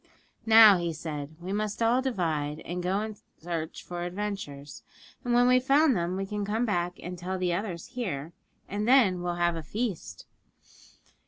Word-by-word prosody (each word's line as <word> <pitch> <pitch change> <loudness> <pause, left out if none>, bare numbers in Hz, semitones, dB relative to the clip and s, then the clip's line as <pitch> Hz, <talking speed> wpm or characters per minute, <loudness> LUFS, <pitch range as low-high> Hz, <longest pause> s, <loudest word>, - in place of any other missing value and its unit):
'Now,' 220 -4 +9
he 170 -1 -2
said, 150 -1 -6
'we 180 +3 -5
must 210 0 -2
all 240 +3 +3
divide, 160 - -2
and 180 +1 -5
go 190 +3 0
in 215 -1 -5 0.2
search 165 -1 -5
for 175 -1 -6
adventures; 175 -7 -5 0.4
and 245 - -2
when 245 0 +5
we've 255 0 +4
found 280 0 +4
them, 175 0 -1
we 195 - -2
can 205 +1 -4
come 220 +4 0
back 175 -5 -1
and 180 0 -6
tell 185 +2 -3
the 180 -1 0
others 180 0 -4
here, 175 - -4 0.3
and 205 +2 -3
then 225 -9 +4
we'll 175 0 -2
have 175 -1 +1
a 165 - -4
feast.' 210 +3 -4
185 Hz, 175 wpm, -28 LUFS, 170-215 Hz, 0.4 s, Now